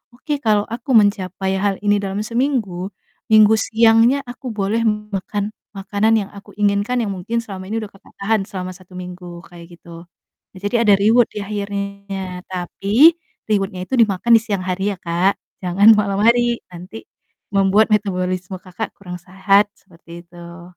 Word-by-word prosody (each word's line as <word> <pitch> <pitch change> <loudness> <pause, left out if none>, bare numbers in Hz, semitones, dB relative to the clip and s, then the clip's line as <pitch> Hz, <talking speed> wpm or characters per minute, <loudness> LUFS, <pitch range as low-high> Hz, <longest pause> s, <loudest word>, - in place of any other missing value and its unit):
"Oke, 290 +3 -3
kalau 210 -4 +2
aku 235 +4 -5
mencapai 195 -2 +2
hal 200 0 0
ini 205 0 +3
dalam 200 +1 -3
seminggu, 230 -7 -1 0.4
Minggu 215 0 +7
siangnya 230 +4 +4
aku 245 +2 -9
boleh 205 +2 -1
makan 210 -1 -3 0.2
makanan 205 +3 +1
yang - - -15
aku 200 - -13
inginkan." 205 +4 +1
Yang 200 - -3
mungkin 235 +6 -3
selama 190 -3 -8
ini 225 +1 -2
udah 205 - -9
Kakak 195 - -21
tahan 215 +1 +1
selama 185 -1 -6
1 185 0 -18
minggu, 180 -1 -9
kayak 170 0 -13
gitu. 170 0 -13 0.5
Jadi 205 +4 -3
ada 205 - +7
reward 220 +4 +4
di - - -6
akhirnya, 200 -2 -5
tapi 200 - +3 0.4
reward-nya 195 -3 -1
itu 265 - -1
dimakan 215 +1 +2
di - - -1
siang 200 -4 -3
hari 190 +2 -1
ya, - - -11
Kak, 175 +3 +1 0.3
jangan 195 +5 +5
malam 200 -1 0
hari 235 +1 +3
nanti 180 +6 -10 0.5
membuat 200 +3 +3
metabolisme, 185 -2 -1
Kakak, 185 +4 -6
kurang 180 -2 -8
sehat, 195 +3 +2
seperti 170 -2 -14
itu. 170 0 -12
200 Hz, 155 wpm, -19 LUFS, 185-215 Hz, 0.5 s, Minggu